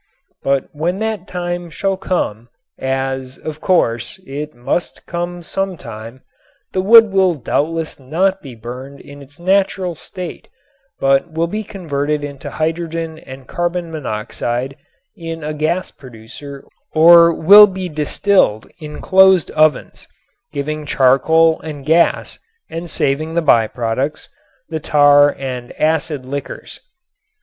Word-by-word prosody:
But 135 -1 0
when 165 +5 -2
that 220 -3 -3
time 175 -1 -4
shall 195 +4 -1
come, 120 - -3 0.3
as, 130 0 -3
of 155 0 -7
course, 120 -5 0
it 150 +1 -6
must 120 +8 -3
come 175 0 -4
some 195 +1 -3
time, 115 0 -10 0.5
the 185 - 0
wood 220 +2 +7
will 190 -3 +3
doubtless 155 +4 -2
not 185 +9 0
be 135 -4 -10
burned 125 +5 -9
in 145 0 -13
its 140 +1 -14
natural 190 0 +1
state 180 +2 -9 0.5
but 135 +4 +2
will 165 +1 0
be 210 +6 -4
converted 150 -7 -3
into 140 -1 -7
hydrogen 160 0 -3
and 130 -3 -12
carbon 175 -1 -3
monoxide 125 -1 -4 0.4
in 165 -4 -7
a 155 +1 -3
gas 155 +5 -1
producer 135 +3 -12 0.3
or 170 +1 +8
will 205 +6 +8
be 190 -1 -5
distilled 155 - +1
in 150 -1 -8
closed 190 -3 +5
ovens 155 -3 +1 0.4
giving 150 +2 -4
charcoal 150 +4 +3
and 145 -3 -8
gas 165 +3 +2 0.3
and 165 +1 -5
saving 155 +3 -1
the 170 - +2
by 115 -7 +4
products, 120 +6 -3 0.4
the 160 - -4
tar 145 -1 +5
and 125 -2 -6
acid 155 -3 0
liquors. 140 +1 -7
155 Hz, 130 wpm, -17 LUFS, 135-175 Hz, 0.5 s, or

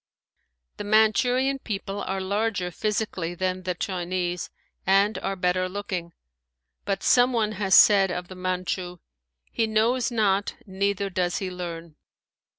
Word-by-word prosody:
The - - -5
Manchurian 245 +6 +3
people 200 -3 -4
are 195 +1 -3
larger 200 -1 -1
physically 195 -4 -2
than 185 +1 -2
the 180 -1 -3
Chinese 180 -1 -3 0.3
and 195 +3 +3
are 195 - -3
better 185 0 0
looking. 185 -3 -5 0.7
But 195 -1 -2
some 250 +1 +4
one 220 -3 +1
has 195 -2 +2
said 195 -2 +7
of 180 0 -4
the 185 - -9
Manchu, 180 -1 -3 0.5
"he 225 - 0
knows 225 +3 +1
not, 205 -4 +1
neither 200 0 -1
does 175 -1 0
he 190 -2 -3
learn." 170 -3 -7
195 Hz, 135 wpm, -25 LUFS, 180-215 Hz, 0.7 s, said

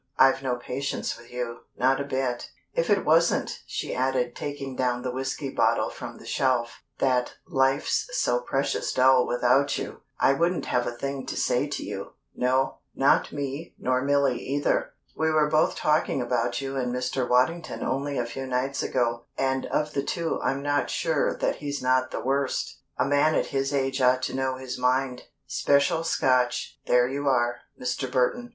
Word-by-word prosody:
I've 135 0 +5
no 130 -2 0
patience 125 +3 -3
with 120 0 -15
you 125 -1 -4 0.2
not 135 +2 +3
a - - -1
bit. 130 -3 -2 0.2
If 165 - 0
it 200 -2 +3
wasn't," 165 +2 +2
she - - -3
added, 125 -1 0
taking 140 -2 -5
down 125 -1 0
the 125 - -2
whiskey 135 +2 -3
bottle - - +2
from - - -8
the - - -14
shelf, 125 -3 0 0.2
"that 125 -2 +1
life's 135 - +1
so - - +2
precious - - -1
dull 130 -1 +5
without 125 +3 +2
you, - - -5 0.2
I 135 - +5
wouldn't 170 +5 0
have 125 -1 0
a - - -1
thing 140 +1 -4
to - - -4
say - - +1
to - - -4
you - - -6 0.2
no, 130 +2 +1 0.2
not 135 +1 +3
me 145 +2 -5
nor 130 0 0
Milly 140 -2 +2
either! 145 +2 0 0.2
We 160 0 +1
were 155 -1 +3
both 155 0 +3
talking 150 -2 +1
about 120 0 0
you 135 0 -4
and 125 -2 -1
Mr. 125 0 -1
Waddington 155 +7 +1
only 140 +1 -1
a 120 - 0
few 130 +3 -6
nights 130 +2 -1
ago, 120 -2 0
and 130 0 0
of 150 0 -1
the 140 - 0
two 165 +4 -2
I'm 135 +1 -1
not 145 0 +1
sure 160 -3 0
that - - 0
he's 145 -1 -4
not 130 0 +2
the - - -4
worst. 135 +1 -1 0.2
A - - +2
man 145 +3 +3
at - - +2
his 135 +1 0
age 135 -1 0
ought 130 0 +4
to - - -2
know 130 0 0
his 130 -1 -6
mind. 125 0 0 0.2
Special 140 +4 +2
Scotch 130 -6 +1
there 125 0 +4
you 140 +2 -3
are, 120 -2 +2 0.2
Mr. 125 +1 -2
Burton. 240 - +1
135 Hz, 180 wpm, -26 LUFS, 125-140 Hz, 0.2 s, I've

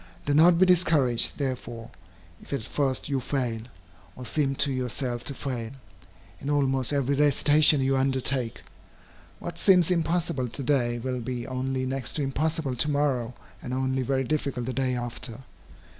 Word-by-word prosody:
Do 145 - +1
not 165 +3 +6
be 185 - +5
discouraged, 160 -9 +3
therefore, 120 -4 -4 0.5
if - - -15
at 135 -5 -2
first 135 +2 -1
you 140 -2 0
fail, 125 -3 -2 0.5
or 125 - -8
seem 135 +2 0
to 140 +1 +1
yourself 125 -1 -3
to 140 - -4
fail, 125 -4 -5 0.7
in 140 - -5
almost 135 -3 +1
every 140 -1 +1
recitation 145 +1 +5
you 135 +1 +2
undertake. 130 -2 0 0.7
What 170 - -7
seems 180 -3 +5
impossible 165 -6 0
to 140 - -6
day, 120 -3 +1
will 125 +1 -3
be 120 0 -4
only 130 0 -2
next 130 -2 -2
to 150 - -1
impossible 145 0 -1
to 150 - +3
morrow, 135 -5 0 0.3
and 125 - -4
only 130 0 0
very 135 +1 0
difficult 140 -3 -2
the 130 - -3
day 130 0 0
after. 120 0 -6
135 Hz, 160 wpm, -26 LUFS, 125-145 Hz, 0.7 s, not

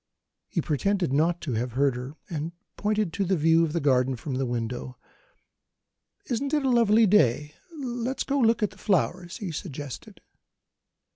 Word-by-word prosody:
He - - -1
pretended 175 +1 0
not 165 +4 +2
to 140 -7 -3
have 120 +2 -2
heard 135 0 +2
her, 125 +4 -6
and 160 0 -4 0.2
pointed 210 -4 0
to 200 - 0
the 190 0 +1
view 165 +2 +4
of 160 - 0
the 170 - 0
garden 130 -2 +2
from 135 +3 -6
the 130 0 -1
window. 120 +1 -4 1.3
"Isn't 275 +5 -1
it 295 -2 0
a - - +3
lovely 230 -2 +5
day? 150 - +3 0.2
Let's 250 -1 -3
go 280 0 0
and 235 - +5
look 225 -1 +2
at 210 - +1
the - - -17
flowers," 180 -2 0
he 200 -7 -5
suggested. 145 -4 -7
165 Hz, 170 wpm, -26 LUFS, 135-210 Hz, 1.3 s, lovely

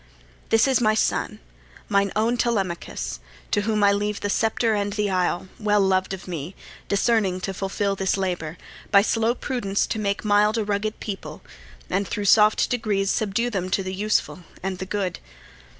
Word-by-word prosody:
This 225 +4 +4
is 265 -2 +3
my 215 -1 +3
son, - - 0 0.5
mine 200 -1 +2
own 225 +3 +2
Telemachus, 185 - -2 0.3
To 205 - +2
whom 210 0 0
I 200 - +6
leave 205 +1 -1
the 205 - -1
sceptre 225 +1 +1
and 205 -1 -1
the 210 -1 0
isle, 180 0 0
Well 210 -1 +2
loved 190 -1 +2
of 190 -1 -6
me, 170 0 -5 0.3
discerning 200 -2 +2
to 195 - -3
fulfil 195 +1 -1
This 195 0 0
labour, 175 -4 -3 0.3
by 200 -1 +6
slow 225 +2 +1
prudence 240 -8 -1
to 220 - -3
make 200 0 -1
mild 210 +2 +3
A 220 - +1
rugged 210 +1 -2
people, 200 -3 -6 0.4
and 195 +1 -1
thro' 205 - -3
soft 210 +1 +5
degrees 205 -5 0
Subdue 230 +2 0
them 185 -3 -2
to 195 - 0
the 185 0 -4
useful 205 0 0 0.2
and 190 -1 -3
the 190 - -5
good. 195 -2 -2
200 Hz, 175 wpm, -24 LUFS, 190-215 Hz, 0.5 s, I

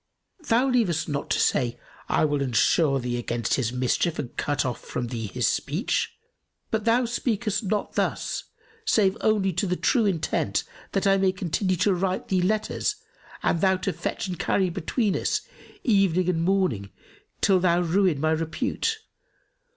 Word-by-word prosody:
Thou 240 +4 +3
leavest 220 - +1
not 145 -2 -3
to - - +1
say, 120 -2 +1 0.3
'I - - +3
will 145 -2 0
ensure 135 +3 +3
thee 120 -1 -2
against 120 -1 -2
his 120 -3 +1
mischief 130 +6 0
and 130 -5 -5
cut 145 0 0
off 125 - -3
from 120 -1 -4
thee 115 -3 -4
his 95 - 0
speech'; - - -1 0.5
but 220 -1 -1
thou 235 +2 +3
speakest 230 -2 -1
not 205 +2 -1
thus - - -1 0.4
save 210 - +3
only 205 -3 +2
to 180 +4 0
the 180 0 -1 0.3
intent 170 -5 0 0.3
that 195 - 0
I 195 0 +5
may 190 -1 +3
continue 185 +1 -1
to 185 +3 +2
write 185 +1 -2
thee 185 -2 +2
letters 215 +4 0 0.5
and 165 - +1
thou 190 -1 +4
to 185 0 -2
fetch 175 +4 -3
and 180 -2 -5
carry 190 -3 +1
between 195 +4 -1
us, - - 0 0.4
evening 190 - +3
and 165 -2 +1
morning, 170 - +1 0.5
till 190 -2 +4
thou 175 -1 +3
ruin 175 -2 +2
my 155 +2 +1
repute. 165 - -1
180 Hz, 160 wpm, -25 LUFS, 150-200 Hz, 0.5 s, I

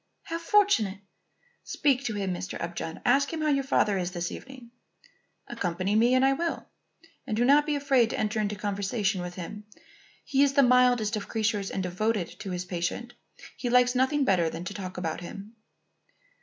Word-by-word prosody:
"How 330 0 -4
fortunate! 335 - +3 0.7
Speak 275 -3 +1
to 220 - -2
him, 195 -2 -2
Mr. 175 - -5
Upjohn. 170 -1 -5
Ask 275 +3 +3
him 325 -1 -4
how 305 - +1
your 275 -2 +2
father 210 -7 +2
is 180 -1 -2
this 175 -1 -4
evening." 260 -3 -10 0.8
"Accompany 190 -3 -2
me 240 +3 +4
and 255 +1 +4
I 270 - +4
will; 335 +4 -3 0.6
and 215 -4 -2
do 240 - +3
not 290 +3 +5
be 300 - +1
afraid 270 -5 +3
to - - -3
enter 215 0 -1
into 210 -1 -1
conversation 200 0 -1
with 175 0 -6
him. 210 +4 -7 0.6
He 275 -1 +1
is 280 -1 +4
the 280 0 +5
mildest 245 -3 +4
of 205 - -6
creatures 210 -3 -1
and 190 - -3
devoted 190 +1 -2
to 195 - -6
his 180 0 -3
patient. 180 +7 -3 0.4
He 245 - -3
likes 250 0 +4
nothing 265 +3 +2
better 175 -7 +2
than 165 +2 -6
to 195 - -5
talk 185 -2 -7
about 165 -2 -3
him." 200 +5 -9
220 Hz, 185 wpm, -27 LUFS, 190-265 Hz, 0.8 s, not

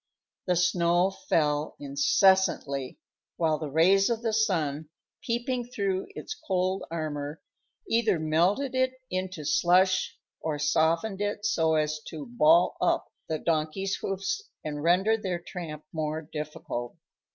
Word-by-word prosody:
The 180 - +3
snow 175 +1 +3
fell 150 -5 0
incessantly, 140 -1 +2 0.4
while 160 -2 +1
the 155 - -4
rays 185 - +4
of 235 -1 -1
the 225 -2 0
sun, 160 -9 0 0.3
peeping 240 +1 -2
through 200 -6 -1
its - - -5
cold 185 - -1
armor, 155 -2 -4 0.5
either 225 -5 +2
melted 175 - +1
it 260 0 +1 0.2
into 185 -4 -3
slush 185 +5 +3 0.2
or 155 -2 -2
softened 165 +7 +1
it 205 0 -2
so 160 -6 +2
as 155 0 0
to 155 -3 -7
"ball 305 +8 +4
up" - - +1 0.2
the 160 - 0
donkeys' 165 +5 -1
hoofs 195 0 -2 0.2
and 150 -1 -4
render 190 +7 +3
their 185 -5 -2
tramp 165 -3 -8
more 155 0 -2
difficult. 150 -5 -6
175 Hz, 130 wpm, -28 LUFS, 155-195 Hz, 0.5 s, rays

